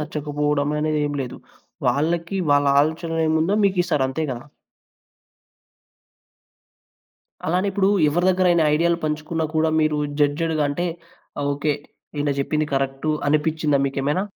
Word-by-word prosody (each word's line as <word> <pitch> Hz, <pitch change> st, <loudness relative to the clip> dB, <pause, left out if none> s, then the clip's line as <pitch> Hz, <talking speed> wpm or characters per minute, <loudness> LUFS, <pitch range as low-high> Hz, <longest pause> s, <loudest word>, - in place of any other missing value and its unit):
నచ్చకపోవడమనేది 150 Hz, 0 st, -1 dB
ఏమి 145 Hz, -1 st, -3 dB
లేదు. 125 Hz, -, -7 dB, 0.5 s
వాళ్ళకి 170 Hz, +5 st, 0 dB
వాళ్ళ 145 Hz, 0 st, +4 dB
ఆలోచన 165 Hz, +2 st, -1 dB
ఏముందో 160 Hz, +5 st, +2 dB
మీకిస్తారు. 175 Hz, -7 st, +1 dB
అంతే 160 Hz, +4 st, -3 dB
గదా! 125 Hz, +2 st, -6 dB, 3.0 s
అలానే 180 Hz, +4 st, +1 dB
ఇప్పుడు 195 Hz, 0 st, +1 dB, 0.2 s
ఎవరి 175 Hz, +5 st, +1 dB
దగ్గరైనా 180 Hz, -3 st, +3 dB
ఐడియా‌లు 170 Hz, +2 st, +2 dB
పంచుకున్నా 155 Hz, +2 st, -2 dB
కూడా 160 Hz, 0 st, +2 dB
మీరు 155 Hz, -1 st, +1 dB, 0.2 s
జడ్జ్‌డ్‌గా 155 Hz, +2 st, +1 dB
అంటే, 175 Hz, +5 st, -2 dB, 0.7 s
ఓకే. 145 Hz, +1 st, 0 dB, 0.4 s
ఈయన 145 Hz, 0 st, 0 dB
జెప్పింది 150 Hz, +2 st, 0 dB
కరెక్టు 135 Hz, +3 st, -1 dB, 0.2 s
అనిపిచ్చిందా 150 Hz, -1 st, +1 dB
మీకేమైనా? 140 Hz, +6 st, -1 dB
155 Hz, 110 wpm, -22 LUFS, 145-170 Hz, 3.0 s, వాళ్ళ